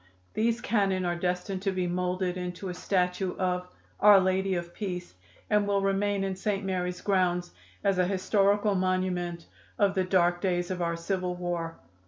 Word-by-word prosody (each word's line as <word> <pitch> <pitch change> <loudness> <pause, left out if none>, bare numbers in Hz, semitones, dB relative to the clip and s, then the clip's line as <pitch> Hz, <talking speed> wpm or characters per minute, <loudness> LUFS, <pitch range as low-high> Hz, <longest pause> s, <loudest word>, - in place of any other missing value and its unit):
These 230 +2 +1
cannon 195 -6 +1
are 175 0 0
destined 180 +2 -2
to 195 0 0
be 185 -1 -1
moulded 180 +1 -1
into 180 +1 -5
a - - -3
statue 180 0 -1
of 180 -1 -1 0.3
'Our 205 -1 +8
Lady 190 0 +1
of 175 0 -4
Peace,' 180 -4 -5 0.3
and 210 -1 +2
will 200 -1 +1
remain 195 0 +1
in 190 -1 -2
St. 195 +1 -2
Mary's 180 -1 -2
grounds 180 -3 +1 0.3
as 195 -2 +2
an 180 0 +2
historical 200 +2 +2
monument 185 -2 -1 0.3
of 200 -2 +3
the 190 -1 +1
dark 175 -1 +2
days 175 -2 0
of 180 -1 -3
our 170 -1 0
civil 180 +1 -2
war." 175 -2 -3
185 Hz, 170 wpm, -28 LUFS, 180-195 Hz, 0.3 s, Our